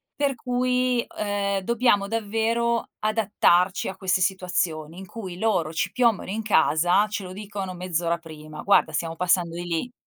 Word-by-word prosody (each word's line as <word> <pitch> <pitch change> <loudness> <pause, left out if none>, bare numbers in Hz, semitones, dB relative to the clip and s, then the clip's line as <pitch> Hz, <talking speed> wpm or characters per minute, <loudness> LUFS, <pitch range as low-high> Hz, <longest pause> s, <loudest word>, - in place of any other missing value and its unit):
Per 280 -2 0
cui, 250 0 0
ehm, 200 -1 0
dobbiamo 220 -1 +2
davvero 230 +2 0
adattarci 205 -4 +2
a 190 - -4
queste 190 -2 +1
situazioni 175 -4 -1
in 195 - -8
cui 190 -2 -8
loro 180 -7 0
ci - - -1
piombano 235 -7 +1
in 215 +3 -2
casa, 175 0 +3
ce 210 -1 -4
lo 185 0 -8
dicono 200 -2 -6
mezz'ora 175 -1 -1
prima: 155 -2 -10
"Guarda 200 - +3
stiamo 165 -1 -2
passando 180 -1 +1
di 175 - -4
lì." 175 +8 -2
195 Hz, 155 wpm, -25 LUFS, 175-225 Hz, -, casa